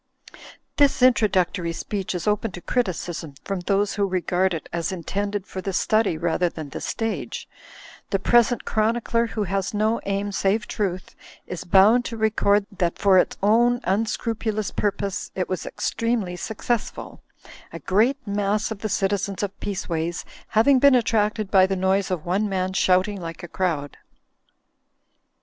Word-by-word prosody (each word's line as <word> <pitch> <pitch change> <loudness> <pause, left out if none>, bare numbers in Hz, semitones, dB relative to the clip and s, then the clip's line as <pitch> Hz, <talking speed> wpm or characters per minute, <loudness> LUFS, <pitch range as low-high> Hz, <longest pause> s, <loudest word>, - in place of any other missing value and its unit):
This 280 -3 +3
introductory 190 -8 +3
speech 195 +1 -4
is 180 - -4
open 210 +2 +1
to 175 - -8
criticism 175 - -2
from 195 -2 -3
those 200 +3 0
who 200 -1 0
regard 185 0 0
it 160 - -7
as 170 +2 -1
intended 200 +3 -3
for 190 - -6
the 195 +1 -4
study 215 -2 +2
rather 170 +2 +1
than 155 -3 -8
the - - -7
stage. 225 -1 -3 0.6
The 195 - +1
present 240 +3 +3
chronicler 230 +1 +1
(who 220 -2 -2
has 195 +1 -2
no 215 +2 +1
aim 200 +1 -1
save 200 +2 0
truth) 185 -3 -3 0.3
is 180 - -6
bound 205 +7 +5
to 230 - -5
record 210 -2 +2
that 170 -1 0
for 195 -2 +5
its - - 0
own 240 +4 +4
unscrupulous 215 +1 -1
purpose 200 -1 -2
it 185 - -1
was 185 -2 -4
extremely 230 -6 -1
successful: 220 +4 -4 0.5
a - - -6
great 225 +8 +2
mass 205 +1 0
of 215 - -5
the 215 - -3
citizens 195 0 -1
of 200 -1 -4
Peaceways 170 -4 -3 0.2
having 255 +5 +4
been 280 0 +6
attracted 215 -3 +1
by 190 -2 +6
the 195 - -1
noise 190 +1 +1
of 180 -4 -3
one 200 +4 0
man 185 -1 -1
shouting 190 +1 +2
like 165 0 -7
a - - -5
crowd. 160 -6 -2
200 Hz, 155 wpm, -23 LUFS, 185-220 Hz, 0.6 s, been